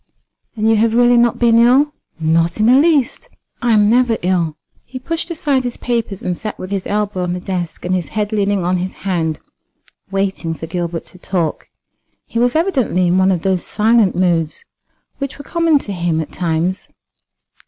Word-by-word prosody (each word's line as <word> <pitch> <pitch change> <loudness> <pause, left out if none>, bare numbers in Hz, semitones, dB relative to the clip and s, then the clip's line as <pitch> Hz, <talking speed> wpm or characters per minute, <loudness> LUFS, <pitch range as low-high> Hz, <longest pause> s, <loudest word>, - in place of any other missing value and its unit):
"And 220 -1 0
you 225 -1 +4
have 225 +1 +2
really 245 0 +5
not 240 0 +3
been 230 -1 +4
ill?" 265 +5 +4 0.3
"Not 165 +3 +1
in 215 - +3
the 245 +3 +6
least. 290 - +2 0.3
I 240 - +1
am 210 -2 +4
never 235 0 +3
ill." 175 -4 0 0.3
He 260 - -9
pushed 330 +6 -3
aside 290 -5 0
his 245 -1 -4
papers, 230 -5 -2
and 180 - -1
sat 215 +3 -6
with 185 - -8
his 195 -2 -2
elbow 205 -2 -1
on 180 -1 -1
the 180 - -3
desk 180 -3 -5
and 180 - 0
his 180 -5 -1
head 210 +5 -2
leaning 205 -3 0
on 180 +1 +1
his 185 +1 -4
hand, 165 -5 -1 0.7
waiting 195 -4 -2
for 160 - -7
Gilbert 170 0 -4
to 185 - -13
talk. 175 -4 -2 0.6
He 230 - -3
was 245 +3 +2
evidently 275 - +1
in 175 +2 +2
one 190 0 +4
of 175 -3 -1
those 190 -2 0
silent 220 -2 +2
moods 170 -3 0 0.5
which 275 -1 -4
were 285 - -10
common 335 -3 +2
to 205 -7 -4
him 170 -3 -1
at 160 - -4
times. 175 +2 -2
200 Hz, 190 wpm, -17 LUFS, 175-240 Hz, 0.7 s, the